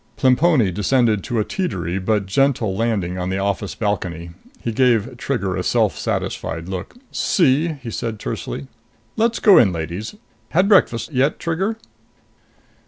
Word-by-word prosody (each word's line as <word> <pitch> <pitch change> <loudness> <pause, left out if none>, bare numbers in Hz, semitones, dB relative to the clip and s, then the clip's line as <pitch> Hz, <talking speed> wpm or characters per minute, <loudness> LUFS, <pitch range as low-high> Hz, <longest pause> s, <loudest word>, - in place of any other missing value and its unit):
Plemponi 130 - +3
descended 105 +2 +1
to 120 0 -2
a 105 - +1
teetery 95 - -3
but 105 0 +1
gentle 115 -1 +1
landing 100 -5 -1
on 90 0 -2
the 95 - -1
office 100 0 -2
balcony. 90 -6 -3 0.3
He 115 - -3
gave 120 0 +2
Trigger 105 -7 -2
a - - -1
self - - +1
satisfied 85 +1 -3
look. 95 - -6 0.2
"See?" 160 -1 +2
he 115 - -5
said 110 0 -3
tersely. 70 -7 -5 0.5
"Let's 230 +1 +1
go 200 - +7
in, 100 -6 +4
ladies. 85 - -5 0.3
Had 185 +5 +3
breakfast 160 - +3
yet, 135 +4 +2
Trigger?" 190 +7 -2
110 Hz, 145 wpm, -20 LUFS, 95-140 Hz, 0.5 s, go